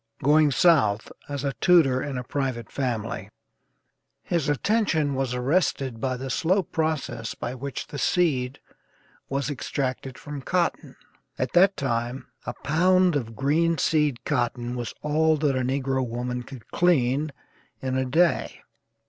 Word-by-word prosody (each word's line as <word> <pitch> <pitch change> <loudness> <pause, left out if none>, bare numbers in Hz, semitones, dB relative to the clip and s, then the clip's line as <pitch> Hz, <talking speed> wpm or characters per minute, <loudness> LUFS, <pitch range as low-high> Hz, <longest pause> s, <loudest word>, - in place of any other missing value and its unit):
Going 150 +1 +5
South 130 - +3 0.2
as 140 -1 -3
a 140 -1 -1
tutor 155 -8 +5
in 140 -3 -4
a 125 - -3
private 125 -4 -3
family, 125 -6 -3 0.9
his 165 -5 0
attention 160 -3 +1
was 130 -2 -1
arrested 130 -3 0
by 130 -1 -1
the 130 +1 -5
slow 185 +8 +2
process 155 -9 -2
by 120 - -4
which 135 +1 -5
the 145 - -7
seed 140 -7 +1 0.7
was 140 +1 -1
extracted 130 -1 -3
from 145 -1 -7
cotton. 175 +5 -1 0.4
At 130 - -2
that 190 +2 +5
time 120 -1 -2 0.2
a 120 - -2
pound 180 +2 +3
of 115 -5 -3
greenseed 150 -1 +1
cotton 120 -3 -1
was 120 -2 -5
all 155 +1 +3
that 145 -2 +1
a 130 - +1
negro 130 +1 0
woman 125 +1 -3
could 125 -1 -11
clean 150 -4 +2 0.5
in 130 -1 -2
a 130 - +1
day. 160 +7 +1
135 Hz, 140 wpm, -25 LUFS, 125-155 Hz, 0.9 s, Going